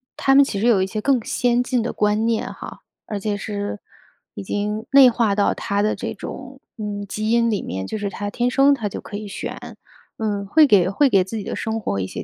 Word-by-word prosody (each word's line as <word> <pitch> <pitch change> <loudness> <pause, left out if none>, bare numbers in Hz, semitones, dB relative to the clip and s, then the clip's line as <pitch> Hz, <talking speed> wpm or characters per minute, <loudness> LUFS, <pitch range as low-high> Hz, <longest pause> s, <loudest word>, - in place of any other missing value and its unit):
它 270 - +2
们 280 - +8
其 205 -7 -3
实 225 - +1
有 205 -6 +4
一 - - +1
些 215 +2 -4
更 255 -1 +2
先 245 0 +1
进 250 -1 0
的 235 - -2
观 210 +1 +1
念 230 -1 -1
哈。 - - -10 0.3
而 210 - -4
且 205 +1 -2
是 205 0 -4 0.6
已 - - -6
经 210 +3 -3
内 270 -2 +8
化 230 -3 +1
到 205 - +2
它 200 0 -2
的 215 - +1
这 - - -5
种， 265 +1 -9 0.2
嗯， 205 -2 -4
基 215 +2 -3
因 235 0 +3
里 210 -3 -1
面， 95 +1 -4
就 - - -4
是 205 -1 -3
它 205 +1 -5
天 240 +4 0
生 275 +2 +4
它 225 -7 -2
就 - - -6
可 205 - -7
以 210 0 -7
选， 200 - -7 0.4
嗯， 205 -2 -2
会 310 +9 +6
给 190 -7 +4
会 270 +9 +3
给 195 -5 +4
自 190 +5 -8
己 215 - -3
的 - - -5
生 220 0 -3
活 100 - -2
一 95 - -1
些 - - -6
215 Hz, 260 characters per minute, -21 LUFS, 205-240 Hz, 0.6 s, 们